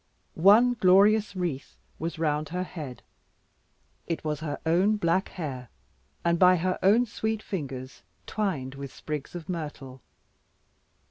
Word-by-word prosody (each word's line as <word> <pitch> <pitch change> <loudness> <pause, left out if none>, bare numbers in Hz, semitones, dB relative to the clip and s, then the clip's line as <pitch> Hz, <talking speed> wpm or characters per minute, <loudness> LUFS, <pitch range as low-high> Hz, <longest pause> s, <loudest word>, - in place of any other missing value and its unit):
One 215 +8 +6
glorious 205 0 +4
wreath 170 -7 -4 0.2
was 165 +2 -4
round 150 -2 -1
her 180 +3 -2
head; 150 -9 -8 1.0
it 165 - -3
was 150 -2 -2
her 150 -2 -4
own 185 +6 +3
black 185 0 +1
hair 130 -8 -6 0.5
by 180 +2 +5
her 185 +2 -1
own 215 +6 +5
sweet 220 -1 -3
fingers 135 - -6 0.2
twined 160 -12 -2
with 140 -1 -8
sprigs 150 +1 -6
of 170 -3 -7
myrtle. 145 -7 -6
170 Hz, 125 wpm, -27 LUFS, 145-190 Hz, 1.0 s, One